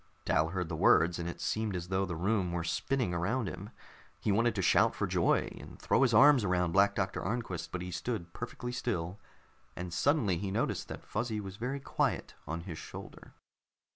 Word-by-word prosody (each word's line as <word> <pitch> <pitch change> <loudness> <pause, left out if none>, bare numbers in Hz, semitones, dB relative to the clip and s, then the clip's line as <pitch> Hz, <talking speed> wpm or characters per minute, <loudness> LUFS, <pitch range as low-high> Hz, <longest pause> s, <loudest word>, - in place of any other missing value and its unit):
Dal 80 - +3
heard 90 0 -2
the - - -4
words, 85 +2 +4
and 85 0 -3
it - - -7
seemed 110 -3 -1
as 90 0 -4
though 95 0 +1
the 85 - -3
room 95 +1 0
were 85 -1 -2
spinning 90 +6 -1
around 105 +7 0
him. 95 +3 -6 0.5
He 105 - 0
wanted 115 +2 +2
to 95 - 0
shout - - +4
for - - 0
joy - - +1
and - - -11
throw - - +2
his 130 -3 +4
arms 135 +2 +7
around 90 -3 +1
Black 100 +3 +4
Doctor 95 -1 -1
Arnquist, 95 -6 -3
but 90 -1 -3
he 90 - -6
stood 90 -1 -4
perfectly 125 +1 -5
still, 100 -6 -3 0.6
and 90 -1 -5
suddenly 110 - +2
he 100 0 -3
noticed 95 - -1
that - - -8
Fuzzy 115 -3 -2
was 95 -1 -7
very 125 +5 -3
quiet 135 - -1
on 80 +2 -3
his 85 -2 -7
shoulder. - - -10
95 Hz, 200 wpm, -32 LUFS, 85-115 Hz, 0.6 s, arms